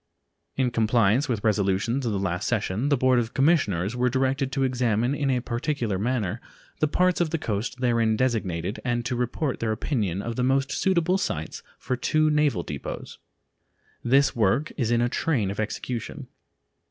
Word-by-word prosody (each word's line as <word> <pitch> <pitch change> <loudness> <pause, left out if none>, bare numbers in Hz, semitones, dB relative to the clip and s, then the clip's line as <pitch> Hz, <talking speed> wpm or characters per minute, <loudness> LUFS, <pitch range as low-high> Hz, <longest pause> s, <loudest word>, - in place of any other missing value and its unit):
In 130 -2 +1
compliance 115 +3 +2
with 115 -4 -1
resolutions 105 +4 +1
of - - 0
the 100 - -1
last 95 +2 -2
session, 110 +3 0
the 145 - +3
Board 130 0 +3
of 115 +1 -3
Commissioners 125 - +2
were 125 0 +2
directed 135 +1 0
to 135 0 0
examine 120 -1 +1
in 145 -1 -1
a 125 -2 +1
particular 120 -4 -2
manner 115 -2 -1 0.4
the 155 - +3
parts 180 +3 +2
of 170 - +1
the 165 - -1
coast 115 0 -3
therein 115 -3 +2
designated 105 -7 -1
and 120 -1 -1
to 125 - -1
report 125 +4 -2
their 110 -1 -1
opinion 105 - -1
of 115 -1 -4
the 125 - +1
most 135 +1 +1
suitable 185 0 +1
sites 80 - -3 0.2
for 130 - -2
two 155 +5 +2
naval 150 - +2
depots. 70 -3 -7 0.8
This 135 +3 +3
work 115 +7 +1
is 120 -5 -1
in 120 0 +2
a 120 - +2
train 120 -6 0
of 100 - -6
execution. 110 +2 -4
120 Hz, 175 wpm, -25 LUFS, 110-135 Hz, 0.8 s, the